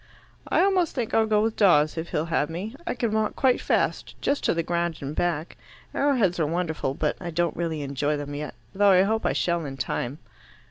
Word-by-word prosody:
"I - - +3
almost 375 -4 +2
think 240 -5 -2
I'll 220 0 +3
go 210 -1 +3
with 225 0 0
Dawes, 155 -7 +4
if 165 +1 -4
he'll 155 - -1
have 150 -1 +1
me. 195 +9 -5
I - - -1
can 235 -3 -1
walk 215 0 0
quite 255 -2 +2
fast - - -1
just 280 - 0
to - - +2
the 165 - 0
ground 170 -1 -1
and 140 +2 -5
back. 170 -2 -1 0.4
Arrowheads 240 -11 +2
are 155 - +2
wonderful, 160 -5 -2
but 150 0 0
I 175 - -4
don't 170 +1 0
really 160 -3 -2
enjoy 145 +2 -1
them 145 0 -6
yet, 145 -3 -5 0.2
though 205 +1 +4
I 185 -1 +6
hope 220 +3 0
I - - +1
shall 170 -1 0
in 135 -2 -6
time." 125 +1 -3
170 Hz, 220 wpm, -25 LUFS, 150-215 Hz, 0.4 s, I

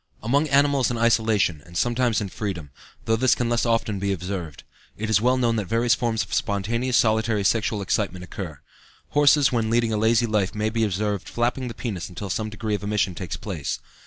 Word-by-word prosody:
Among 140 +7 +2
animals 140 -2 +3
in 120 - -2
isolation, 110 -8 +2
and 85 +3 -9
sometimes 120 0 +1
in 100 - -3
freedom 90 -9 -5 0.3
though 110 - +2
this 130 +3 +3
can 120 -1 -1
less 120 0 +1
often 115 -3 0
be 100 +1 -1
observed 90 -5 -5 0.3
it 110 +1 -3
is 105 -1 +4
well 125 +2 +3
known 120 -2 +1
that 105 - -1
various 115 +2 +2
forms 115 -1 0
of - - -9
spontaneous 115 +1 0
solitary 110 -1 +2
sexual 105 0 +1
excitement 95 -2 -1
occur. 85 -6 -7 0.5
Horses 145 -1 +4
when 115 -3 0
leading 115 -1 +2
a - - +1
lazy 115 +2 +3
life 105 -4 0
may 105 +1 -1
be 115 0 0
observed 105 0 -1
flapping 125 +2 -1
the 115 - -6
penis 95 -9 -4
until 95 +1 -6
some 110 +3 -2
degree 105 +1 -4
of 100 - -1
emission 100 -2 0
takes 85 -3 -5
place. 80 -9 -4
110 Hz, 200 wpm, -24 LUFS, 100-120 Hz, 0.5 s, is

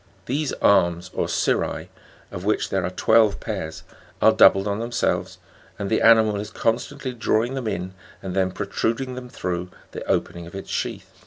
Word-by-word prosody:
These 145 +2 -1
arms 90 -2 +3
or - - -1
cirri, - - 0 0.4
of 90 - -6
which 105 +2 0
there 95 -1 0
are 90 - -1
twelve 110 +2 +3
pairs, 95 -8 -5 0.4
are - - +6
doubled 95 +1 +5
on 100 +1 -1
themselves, 120 +1 -1 0.4
and 100 +1 -4
the 110 - +2
animal 110 -2 +5
is 105 +1 -5
con 115 0 +1
stantly 135 -3 -7
drawing 115 +1 +1
them 130 -4 -3
in 95 -2 -3 0.3
and 95 -1 -6
then 95 -1 +2
protruding 115 +6 -2
them 125 0 -8
through 90 -6 -3 0.2
the - - -6
opening 85 -1 -1
of 85 - -11
its 95 - -7
sheath. - - -3
105 Hz, 175 wpm, -23 LUFS, 95-115 Hz, 0.4 s, are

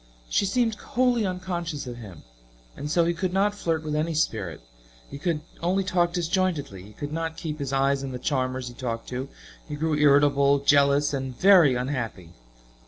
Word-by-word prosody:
She 200 - +2
seemed 230 +2 +1
wholly 240 0 0
unconscious 175 -5 -4
of 120 -1 -7
him, 100 -9 -11 0.5
and 145 - -5
so 170 +2 +3
he 170 - +1
could 180 +1 -2
not 200 +2 +2
flirt 165 -5 -2
with 150 -1 -3
any 160 +2 -1
spirit; 100 - -1 0.5
he 140 - -7
could 160 -1 -1 0.2
only 185 +3 +1
talk 175 -2 +1
disjointedly; 170 - -1
he 105 +3 -13
could 145 +6 -6
not 165 0 -3
keep 155 -2 -5
his 140 -2 -3
eyes 135 0 +1
on 135 - -4
the 125 - -4
charmers 130 -1 -2
he 120 - -8
talked 115 -2 -5
to; 130 +2 -4 0.4
he 150 - -4
grew 160 +1 -1
irritable, 140 -1 +4
jealous, 140 +1 +3
and 130 -2 -4
very 180 -9 +6
unhappy. 120 - -4
145 Hz, 180 wpm, -25 LUFS, 130-175 Hz, 0.5 s, very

